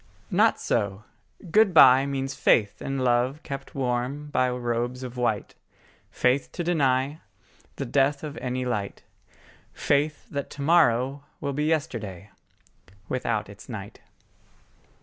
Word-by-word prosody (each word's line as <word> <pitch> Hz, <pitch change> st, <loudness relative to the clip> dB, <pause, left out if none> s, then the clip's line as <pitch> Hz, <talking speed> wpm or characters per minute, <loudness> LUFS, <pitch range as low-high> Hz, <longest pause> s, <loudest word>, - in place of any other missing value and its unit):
Not -, -, +3 dB
so: 100 Hz, 0 st, -1 dB, 0.5 s
good 205 Hz, -2 st, +4 dB
bye 135 Hz, -2 st, +8 dB
Means 135 Hz, -1 st, -3 dB
faith 105 Hz, -6 st, +2 dB
in 135 Hz, 0 st, -3 dB
love 130 Hz, +3 st, +1 dB
kept 135 Hz, -1 st, -7 dB
warm 135 Hz, +3 st, -2 dB
by 130 Hz, -2 st, +2 dB
robes 120 Hz, +1 st, -2 dB
of 125 Hz, -1 st, -7 dB
white, 120 Hz, -4 st, -1 dB, 0.6 s
Faith 130 Hz, +2 st, +1 dB
to 175 Hz, -, -3 dB
deny 140 Hz, -3 st, +1 dB, 0.5 s
The 140 Hz, -, -4 dB
death 140 Hz, +3 st, +1 dB
of 150 Hz, -1 st, -6 dB
any 125 Hz, 0 st, -3 dB
light, 105 Hz, -5 st, -3 dB, 0.7 s
Faith 145 Hz, +1 st, 0 dB
that 140 Hz, -2 st, -4 dB
to 140 Hz, -, -7 dB
morrow 140 Hz, -3 st, +3 dB
will 140 Hz, -1 st, -3 dB
be 150 Hz, +2 st, -1 dB
yesterday 110 Hz, -, -2 dB, 0.8 s
Without 115 Hz, -4 st, -1 dB
its 100 Hz, +3 st, -13 dB
night. 100 Hz, -4 st, -8 dB
130 Hz, 130 wpm, -26 LUFS, 120-140 Hz, 0.8 s, bye